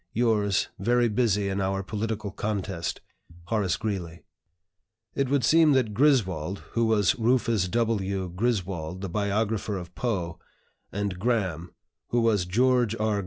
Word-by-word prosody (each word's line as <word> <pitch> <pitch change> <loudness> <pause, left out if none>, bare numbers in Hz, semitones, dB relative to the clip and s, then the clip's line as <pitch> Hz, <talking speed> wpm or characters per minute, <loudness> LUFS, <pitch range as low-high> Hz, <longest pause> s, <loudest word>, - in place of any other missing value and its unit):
"Yours, 105 -4 +1
very 120 +4 +3
busy 105 -3 +1
in 100 0 -1
our 95 0 -1
political 110 0 -3
contest, 95 -5 -3 0.5
"HORACE 105 -6 +1
GREELEY." 90 -7 -4 0.9
It 135 -2 0
would 140 -2 +2
seem 155 +3 +5
that 125 -5 +1
"Griswold" 100 - +1
(who 115 -1 +1
was 105 -4 +2
Rufus 115 -4 +2
W. 100 -3 0
Griswold, 95 -4 -2
the 95 - -4
biographer 105 +2 -1
of 90 -1 -8
Poe) 90 -9 -2 0.5
and 100 -2 -3
"Graham" 95 -7 -1 0.3
(who 120 - +1
was 105 -6 +2
George 120 +2 +2
R. 110 -2 0
105 Hz, 130 wpm, -26 LUFS, 95-115 Hz, 0.9 s, seem